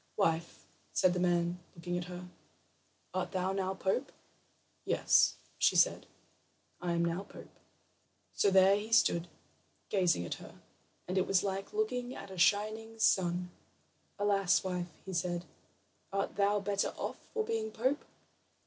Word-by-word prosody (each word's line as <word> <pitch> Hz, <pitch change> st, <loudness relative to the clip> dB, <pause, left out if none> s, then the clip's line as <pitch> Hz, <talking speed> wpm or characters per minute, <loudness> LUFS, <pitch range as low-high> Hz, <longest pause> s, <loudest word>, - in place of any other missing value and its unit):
"Wife," 170 Hz, -4 st, 0 dB, 0.3 s
said 185 Hz, -1 st, +4 dB
the 180 Hz, -, -1 dB
man, 175 Hz, 0 st, +1 dB, 0.2 s
looking 175 Hz, +1 st, -4 dB
at 175 Hz, 0 st, -2 dB
her, 180 Hz, 0 st, -8 dB, 0.9 s
"art 185 Hz, +1 st, -2 dB
thou 185 Hz, 0 st, 0 dB
now 190 Hz, 0 st, -1 dB
pope?" 195 Hz, +9 st, -1 dB, 0.7 s
"Yes," -, -, +4 dB, 0.2 s
said -, -, +4 dB
she; -, -, +7 dB
"now -, -, -11 dB, 0.9 s
I -, -, +1 dB
am 170 Hz, 0 st, +1 dB, 0.2 s
pope." -, -, -12 dB, 0.8 s
So 200 Hz, -, +3 dB
there 190 Hz, +1 st, +6 dB
he 215 Hz, +2 st, -6 dB
stood 170 Hz, -6 st, +4 dB, 0.6 s
gazing 180 Hz, -, +2 dB
at 85 Hz, -, -3 dB
her, -, -, -12 dB, 0.5 s
and 185 Hz, +1 st, +1 dB
it 185 Hz, -, 0 dB
was 195 Hz, -2 st, +3 dB
like 195 Hz, 0 st, -3 dB
looking 260 Hz, -, -2 dB
at 195 Hz, -, -9 dB
a 190 Hz, -, -8 dB
shining 215 Hz, +4 st, +2 dB
sun. 180 Hz, -4 st, +2 dB, 0.7 s
"Alas, 200 Hz, -3 st, +3 dB
wife," 180 Hz, -2 st, -3 dB, 0.2 s
he 190 Hz, -, -6 dB
said, 175 Hz, 0 st, -1 dB, 0.7 s
"art 195 Hz, 0 st, -2 dB
thou 205 Hz, +1 st, +3 dB
better 200 Hz, 0 st, -1 dB
off -, -, -4 dB
for 445 Hz, -, 0 dB
being 220 Hz, -1 st, -1 dB
pope?" 255 Hz, +7 st, 0 dB
190 Hz, 145 wpm, -32 LUFS, 180-205 Hz, 0.9 s, she